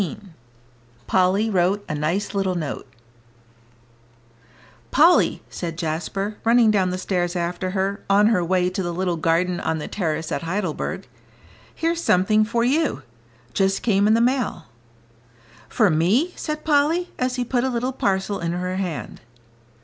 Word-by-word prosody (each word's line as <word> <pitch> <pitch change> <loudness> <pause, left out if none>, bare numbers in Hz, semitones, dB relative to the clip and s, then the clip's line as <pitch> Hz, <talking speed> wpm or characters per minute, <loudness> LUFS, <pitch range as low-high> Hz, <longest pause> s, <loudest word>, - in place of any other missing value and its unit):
XVII 180 - -3 0.9
POLLY 190 +4 +2
WROTE 190 +2 +1
A - - -3
NICE 165 +8 -1
LITTLE 195 -2 0
NOTE 155 -5 -4 2.0
"Polly," - - +4
said 165 -2 -6
Jasper, 175 +6 -3
running 230 -1 +5
down 190 -3 +2
the 180 - -2
stairs 180 -1 -1
after 175 +1 -2
her, 195 +1 -2
on 200 +1 +5
her 210 -5 +3
way 180 +1 +1
to 190 - -3
the 175 -1 -3
little 180 -1 -1
garden 170 +3 +1
on 160 - -1
the 150 - -5
terrace 160 -5 -3
at - - -2
Heidelberg, 175 -1 -3 0.7
"here's 335 +1 -1
something 215 - +3
for 235 +2 0
you; 290 +5 +1 0.5
just 195 0 +1
came 200 -3 +3
in 215 - +5
the 230 - +3
mail." 245 -8 0 1.0
"For 215 -7 +3
me," 205 - +2
said 305 0 -5
Polly, 315 +4 +2
as 255 0 0
he 250 -1 -2
put 245 0 0
a 265 - +1
little 250 +1 -2
parcel 195 -3 -1
in 170 0 -2
her 180 +1 -3
hand. 180 -6 -5
195 Hz, 150 wpm, -22 LUFS, 175-230 Hz, 2.0 s, running